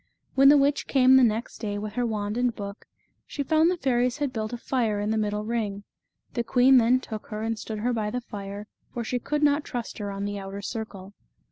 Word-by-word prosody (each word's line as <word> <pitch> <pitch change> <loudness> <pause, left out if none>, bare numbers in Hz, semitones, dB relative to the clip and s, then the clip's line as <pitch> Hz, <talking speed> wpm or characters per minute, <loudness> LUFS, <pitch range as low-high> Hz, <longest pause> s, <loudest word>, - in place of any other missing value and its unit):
When 275 +1 +7
the 290 - +8
witch 280 +1 +2
came 260 -1 +5
the 265 - +7
next 225 0 0
day 205 -2 -3
with 210 0 -5
her 245 +1 0
wand 210 -1 -2
and 245 -1 +1
book, 200 -1 -8 0.4
she 285 - -3
found 315 +3 +3
the 360 - 0
fairies 250 -3 +1
had 285 -3 -2
built 215 0 -3
a 240 - -4
fire 230 -4 0
in 205 +1 -1
the - - +1
middle 210 0 -1
ring. 215 -3 -2 0.5
The 235 - -1
queen 250 +3 +5
then 245 +2 +4
took 220 -4 -7
her 215 0 -5
and 225 -1 -2
stood 220 - -5
her 240 +4 0
by 215 -2 -1
the 250 +3 -3
fire, 200 -2 -7 0.3
for 240 - -4
she 245 +2 -2
could 300 +4 -2
not 290 0 +3
trust 240 -5 -5
her 205 -1 -3
on 200 0 -4
the 205 0 -3
outer 195 +1 -7
circle. 200 -3 -6
225 Hz, 235 wpm, -26 LUFS, 210-255 Hz, 0.5 s, the